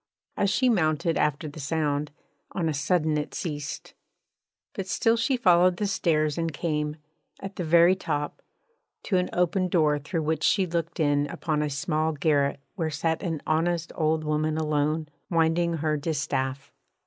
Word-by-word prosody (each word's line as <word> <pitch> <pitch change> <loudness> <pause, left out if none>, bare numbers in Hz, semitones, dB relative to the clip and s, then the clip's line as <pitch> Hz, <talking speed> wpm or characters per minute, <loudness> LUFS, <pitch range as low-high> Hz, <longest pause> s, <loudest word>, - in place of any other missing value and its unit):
As 200 - +1
she 255 +5 +2
mounted 165 - +2
after 150 +1 0
the 150 +1 -9
sound, 150 0 -1 0.4
on 175 -3 -1
a 155 - 0
sudden 155 +1 +1
it 150 - -5
ceased; 145 -4 -5 0.8
but 195 - -5
still 225 +4 +2
she 235 +3 +1
followed 180 -4 +4
the 210 - -1
stairs 165 -7 +1
and 165 0 -1
came, 150 -1 -2 0.4
at 195 0 -7
the 180 - -3
very 170 +3 +5
top, 150 -5 -3 0.6
to 190 - +1
an 180 0 0
open 180 +1 +1
door 155 -4 +2
through 160 +3 -3
which 155 0 -1
she 195 -2 +3
looked 170 -1 -3
in 145 -1 +2
upon 150 +1 -2
a 150 - 0
small 155 +2 -1
garret 145 -2 +1
where 165 -4 -2
sat 160 +2 -1
an 165 -5 -3
honest 170 +1 0
old 155 0 0
woman 155 0 0
alone, 155 0 0 0.2
winding 170 0 +2
her 155 -1 0
distaff. 140 -3 -2
160 Hz, 160 wpm, -26 LUFS, 150-175 Hz, 0.8 s, very